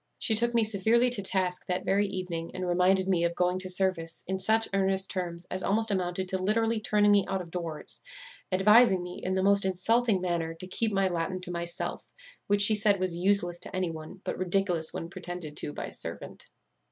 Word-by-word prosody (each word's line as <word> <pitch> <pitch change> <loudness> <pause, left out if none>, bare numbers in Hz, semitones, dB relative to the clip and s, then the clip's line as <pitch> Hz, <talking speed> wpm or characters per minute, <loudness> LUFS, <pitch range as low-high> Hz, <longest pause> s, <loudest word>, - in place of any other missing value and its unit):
She 225 - +1
took 235 +2 +3
me 230 - +4
severely 220 +4 +2
to 220 - +2
task 185 -2 -1
that 180 -1 -2
very 200 +1 +2
evening, 180 -4 -4
and 185 -1 -3
reminded 185 +2 +2
me 180 -3 +1
of 170 0 0
going 180 +1 +1
to 185 0 0
service 180 -3 0
in 190 +1 -3
such 220 +4 +1
earnest 195 0 +1
terms 175 -2 -4
as 185 - -3
almost 220 +3 +1
amounted 185 -1 -2
to 190 0 -2
literally 225 +3 +1
turning 210 -1 +2
me 200 -1 +5
out 190 0 -1
of 170 -2 -9
doors; 165 -3 -3 0.5
advising 195 0 +5
me, 180 0 -8
in 185 +1 -1
the 190 - 0
most 200 0 +5
insulting 195 +3 +1
manner, 170 -2 -2
to 175 - -9
keep 215 +4 -1
my 195 -1 +2
Latin 180 +1 -2
to 180 - -7
myself, 170 0 -5 0.4
which 205 0 +6
she 215 - +5
said 210 -2 +2
was 185 -2 0
useless 175 -1 +1
to - - -5
any 185 -2 -1
one, 160 +4 -10
but - - -4
ridiculous 180 -3 0
when 165 - -5
pretended 170 -3 -7
to - - -1
by - - -6
a - - -9
servant. - - -8
185 Hz, 210 wpm, -28 LUFS, 175-200 Hz, 0.5 s, which